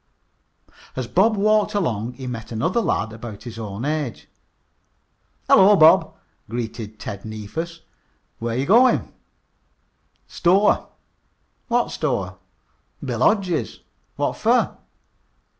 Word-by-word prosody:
As 130 - -3
Bob 210 - +2
walked 215 +1 +2
along 120 - -1
he 130 - -9
met 115 -3 -6
another 165 - 0
lad 110 - -1
about 115 -2 -9
his 120 -2 -8
own 105 +2 -5
age. 150 -5 -3 1.2
"Hello, 200 +2 +7
Bob," 160 -4 +5 0.3
greeted 110 -2 -5
Ted 100 0 -7
Neefus. 135 +11 -6 0.6
"Where 115 0 -2
you 135 - 0
goin'?" 240 - +4 1.1
"Store." 190 +4 +2 0.8
"What 240 0 +1
store?" 100 - -2 0.7
"Bill 120 -4 -3
Hodge's." 185 - +1 0.3
"What - - -1
fer?" - - +2
130 Hz, 105 wpm, -22 LUFS, -, 1.2 s, Hello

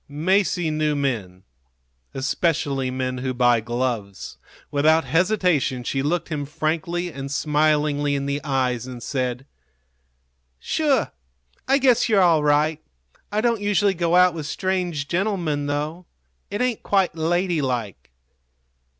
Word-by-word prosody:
Masie 175 +2 +1
knew 155 -1 0
men 110 -10 -3 0.7
especially 140 -1 0
men 130 0 -3
who 130 0 -3
buy 120 -1 +4
gloves. 120 -4 -4 0.3
Without 155 +3 +3
hesitation 175 - +1
she 135 +3 -1
looked 165 +6 -1
him 150 -3 -3
frankly 165 +3 -2
and 135 0 -6
smilingly 150 -1 +1
in 140 0 -2
the 140 +1 -2
eyes, 130 -4 -1
and 125 -2 -8
said: 130 -2 -3 1.1
"Sure. 280 - 0 0.6
I 270 - +4
guess 255 -3 +3
you're 210 -3 +4
all 170 -5 +4
right. 150 +1 +2 0.5
I 210 +1 0
don't 230 -2 +1
usually 205 -1 +2
go 170 -1 0
out 180 -1 +5
with 155 -3 -5
strange 180 -4 -2
gentlemen, 170 -6 -1
though. 150 +5 -3 0.4
It 205 +4 -1
ain't 250 -3 -1
quite 195 -4 +1
ladylike. 155 - -1
150 Hz, 125 wpm, -23 LUFS, 135-180 Hz, 1.1 s, out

